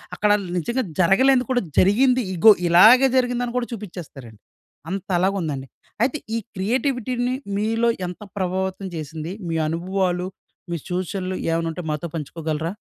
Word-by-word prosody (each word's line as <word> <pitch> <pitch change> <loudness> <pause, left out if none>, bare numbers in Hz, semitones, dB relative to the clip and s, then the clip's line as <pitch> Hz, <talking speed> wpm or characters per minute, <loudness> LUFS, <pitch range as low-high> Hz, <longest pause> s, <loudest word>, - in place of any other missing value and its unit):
అక్కడ 210 - +1 0.3
నిజంగా 235 +9 -1 0.2
జరగలేనిది 250 +8 +4
కూడా 245 -1 +2 0.2
జరిగింది, 250 +7 +4
ఇగో 195 +6 +8 0.2
ఇలాగే 220 +10 +7
జరిగిందని 245 -1 0
కూడా 245 -1 -1
చూపించేస్తారండి. 155 - -9 0.5
అంతలాగా 190 0 0
ఉందండి. 140 -5 -4 0.4
అయితే 265 +4 +1 0.2
ఈ - - +1 0.2
క్రియేటివిటీ‌ని 245 +3 -1 0.2
మీలో 225 +3 +1 0.2
ఎంత 180 +3 -8 0.2
ప్రభావితం 190 +1 -2
చేసింది? 160 +2 -5 0.2
మీ 165 - -1
అనుభవాలు, 180 +2 -1 0.4
మీ 170 - -1
చూచనలు 185 +1 -3
ఏవైనా 165 0 0
ఉంటే 180 - -6
మాతో 150 +3 -2
పంచుకోగలరా? 160 +1 -3
190 Hz, 125 wpm, -22 LUFS, 170-235 Hz, 0.5 s, ఇగో